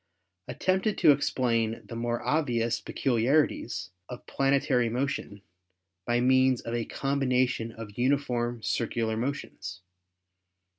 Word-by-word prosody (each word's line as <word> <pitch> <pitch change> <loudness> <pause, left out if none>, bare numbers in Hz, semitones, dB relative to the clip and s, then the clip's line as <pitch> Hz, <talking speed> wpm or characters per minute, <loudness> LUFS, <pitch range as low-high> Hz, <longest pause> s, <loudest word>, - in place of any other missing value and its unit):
at - - -7
tempted 190 +3 +1
to - - +6
explain 115 -5 0
the 115 - -8
more 120 0 -2
obvious 120 -7 0
peculiarities 120 -6 0 0.2
of 125 - -8
plane 135 0 +2
tary 125 -3 +1
motion 120 -5 -3 0.6
by 120 0 +2
means 130 0 +4
of 115 - -6
a 120 -1 -1
combination 130 -4 0
of 110 -1 -10
uniform 125 -3 0
circu 115 0 -1
lar 110 0 -1
motions. 110 -7 -4
120 Hz, 120 wpm, -28 LUFS, 115-135 Hz, 0.6 s, to